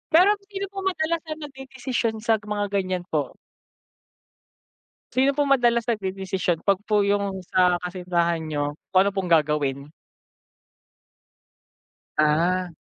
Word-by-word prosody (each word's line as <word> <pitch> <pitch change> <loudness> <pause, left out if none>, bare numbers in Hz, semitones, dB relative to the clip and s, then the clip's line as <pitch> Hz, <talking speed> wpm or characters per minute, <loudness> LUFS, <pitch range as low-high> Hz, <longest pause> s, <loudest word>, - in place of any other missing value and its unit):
Pero 365 +5 +7 0.2
sino 395 -1 -4
po 390 - -4
madalas 330 -1 -1
na 310 - -3
nag-dedesisyon 265 -4 -3
sa 225 - +4 0.2
mga 205 0 -1
ganyan 185 -2 -1
po? - - -1 1.8
Sino 265 +2 +3
po 290 - 0
madalas 240 -3 +3
nag-dedesisyon 190 -4 -1
'pag 200 -1 +2
po 210 -1 +3
yung 200 -1 0
sa 180 -1 +3
kasintahan 175 -2 -1
niyo 145 -1 -2 0.2
kung 185 - +7
ano 200 - +3
pong 195 -1 -3
gagawin? 145 -3 +1 2.3
Ah. 170 +4 +2
195 Hz, 115 wpm, -24 LUFS, 175-245 Hz, 2.3 s, Pero